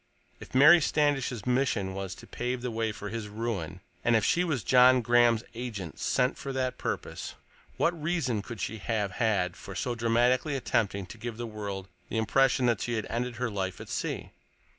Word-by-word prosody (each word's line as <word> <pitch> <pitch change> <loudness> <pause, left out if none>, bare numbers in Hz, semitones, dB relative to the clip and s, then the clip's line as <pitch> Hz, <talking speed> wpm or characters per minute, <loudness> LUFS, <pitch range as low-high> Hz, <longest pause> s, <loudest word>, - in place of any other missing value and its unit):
If - - -11
Mary 150 +6 +8
Standish's 140 -7 +1
mission 125 -7 +1
was 95 -1 -5
to - - -13
pave 125 0 -3
the 125 - -2
way 110 -1 -1
for 105 -1 -7
his 110 -1 -4
ruin, 105 -6 -4 0.2
and 120 - +4
if 110 - +3
she 175 - +3
was 155 -9 -1
John 125 0 +6
Graham's 120 -1 +4
agent 110 -8 -6
sent 125 +1 +1
for 140 - -4
that 130 -1 -2
purpose, - - -4 0.4
what 170 -2 +1
reason 150 -9 0
could 115 +1 -8
she 110 +3 -3
have 105 -2 -1
had 95 -4 0
for 100 - -9
so 125 - -1
dramatically 120 +5 +2
attempting 100 -6 0
to 110 +5 -12
give 115 0 -5
the 120 - -4
world 100 -3 -5 0.2
the - - -2
impression 130 +3 +3
that 120 -4 +2
she 120 - -2
had 110 - -2
ended 120 +1 -2
her 120 0 -2
life 95 -2 -3
at - - -9
sea? - - -3
115 Hz, 190 wpm, -29 LUFS, 105-125 Hz, 0.4 s, Mary